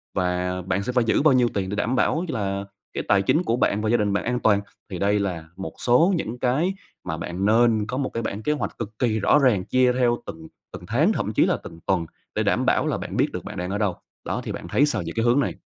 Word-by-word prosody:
và 90 0 -1
bạn 95 +2 -1
sẽ 125 - -2
phải 125 - +3
giữ 115 - +2
bao 150 -2 +5
nhiêu 125 -2 +4
tiền 95 -2 -2
để 100 - -3
đảm 115 +5 0
bảo 160 +7 +1
cho 155 - -3
là 100 0 -2 0.3
cái - - -3
tài 100 -1 +4
chính 155 - +2
của 115 - +1
bạn 105 -4 +1
và 110 - 0
gia 120 - +4
đình 105 -2 0
bạn 100 - 0
an 125 +1 -1
toàn? 105 -3 +3 0.3
Thì 90 -3 -5
đây 100 +1 +2
là 90 -5 -3
một 95 - -6
số 160 +11 +4
những 120 -7 -4
cái 140 +10 +1 0.3
mà 80 -3 -4
bạn 90 +3 -3
nên 110 0 +3
có 125 - -3
một 135 -1 -1
cái 115 - -4
bảng 105 +2 -4
kế - - +1
hoạch 150 - -4
cực 110 -2 -7
kỳ 110 -3 +1
rõ 125 - +4
ràng 115 -10 +3
chia 130 -1 +3
theo 120 -1 +2
từng 80 0 -8 0.3
từng 90 - -8
tháng, 150 - +3
thậm 105 - -2
chí - - +4
là - - +1
từng 80 - -10
tuần 95 -4 +1 0.3
để - - +1
đảm - - +1
bảo - - +2
là - - 0
bạn - - -5
biết - - +2
được - - -5
bạn - - -8
đang 90 +1 -3
ở 100 - -1
đâu. 105 -4 0 0.3
Đó, - - -2
thì - - -4
bạn - - -6
thấy 145 - +3
sao 150 - -1
về 85 - -4
cái 115 - 0
hướng 120 +3 +4
này? 140 - -1
110 Hz, 285 wpm, -24 LUFS, 95-125 Hz, 0.3 s, bao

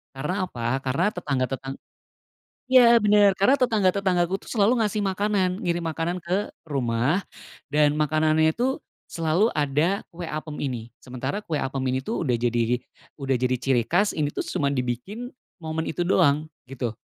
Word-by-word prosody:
Karena 180 +8 -2
apa? 120 -1 -2
Karena 140 +10 0
tetangga, 140 -8 -1
tetang 135 0 -5 0.9
ya 235 -2 +7
benar, 205 -1 +5
karena 200 +9 +3
tetangga-tetanggaku 195 -6 +1
tuh - - -11
selalu 225 +1 +3
ngasih 210 0 -1
makanan, 195 -1 0
ngirim 175 0 0
makanan 170 +3 -2
ke 185 +5 -2 0.2
rumah. 130 +6 0 0.4
Dan 150 0 +3
makanannya 155 +1 +2
itu 260 +3 0 0.3
selalu 170 +7 +1
ada 150 +7 +1
kue 175 +1 -8
apem 155 -1 -5
ini. 125 -5 -3 0.2
Sementara 130 +11 -4
kue 155 -3 -2
apem 135 0 -3
ini 130 - 0
tuh 215 - -3
udah 125 -5 0
jadi 120 0 +1 0.4
udah 135 -1 0
jadi 125 +1 +1
ciri 130 -3 +1
khas, 200 - +1
ini 150 -2 0
tuh - - -4
cuma 140 -1 0
dibikin 130 - -4 0.3
momen 160 0 -3
itu 175 +2 -2
doang 155 -5 +3 0.2
gitu. 120 -4 -3
160 Hz, 155 wpm, -25 LUFS, 135-195 Hz, 0.9 s, ya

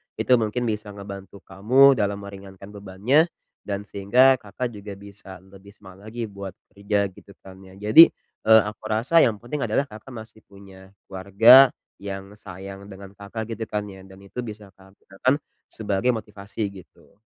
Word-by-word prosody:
Itu 125 -2 +2
mungkin 110 +2 -2
bisa 105 -2 -3
ngebantu 100 0 -10
kamu 125 +7 +4
dalam 100 -1 -2
meringankan 100 0 -11
bebannya 105 - +1 0.4
dan 100 0 -3
sehingga 120 +7 +3
Kakak 120 +4 -5
juga 100 -2 -9
bisa 100 -2 -10
lebih 95 +1 -17
semangat 95 +1 -15
lagi 115 +2 -5
buat 100 -2 -8 0.2
kerja 100 -1 -1
gitu 100 +1 -17
kan 95 0 -13
ya. 95 0 -15
Jadi, 105 +12 +8 0.4
eee, 110 0 +8
aku 105 +1 -8
rasa 120 +10 +2
yang 115 -8 +3
penting 120 +4 -5
adalah 110 +6 +1
Kakak 120 0 -13
masih 110 -1 -11
punya 95 -1 -16 0.2
keluarga 105 +8 +7 0.3
yang 100 0 -8
sayang 100 0 -10
dengan 100 0 -12
Kakak 100 +3 -7
gitu 110 - -5
kan 105 -1 -3
ya 95 -1 -12
dan 95 0 -16
itu 100 +6 -8
bisa 105 -3 -9
Kakak 95 0 -21
gunakan 95 +7 -1 0.3
sebagai 105 +3 -1
motivasi 105 -2 -5
gitu. 100 -2 -16
100 Hz, 165 wpm, -23 LUFS, 95-110 Hz, 0.4 s, Jadi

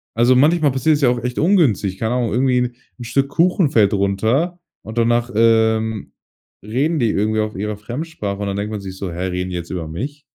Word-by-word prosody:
Also, 120 +3 +4
manchmal 150 +2 +4
passiert 145 +4 +2
es - - -7
ja 130 - +4
auch 120 -1 -1
echt 125 0 -3
ungünstig, 140 - +2
keine 110 +4 -1
Ahnung. 120 -3 0
Irgendwie 125 +1 +2
'n 125 -1 -2 0.2
'n - - -6
Stück 135 +4 0
Kuchen 170 +1 +2
fällt 105 -3 +4
runter, 110 - 0 0.2
und 110 +2 -9
danach, 120 +1 +1
ähm, 110 -1 +2 0.5
reden 140 +10 0
die 115 -3 +2
irgendwie 110 +2 0
auf 105 0 -4
ihrer 105 +2 -3
Fremdsprache, 115 -3 -5
und 100 - -2
dann 100 - -2
denkt 105 +1 -3
man 105 - -4
sich 95 -1 -8
so: 95 -2 -5
„Hä, 90 +2 -4
reden 90 0 -3
die - - -4
jetzt 85 0 -7
über 85 -3 -4
mich?“ 140 - -6
115 Hz, 220 wpm, -19 LUFS, 100-135 Hz, 0.5 s, Also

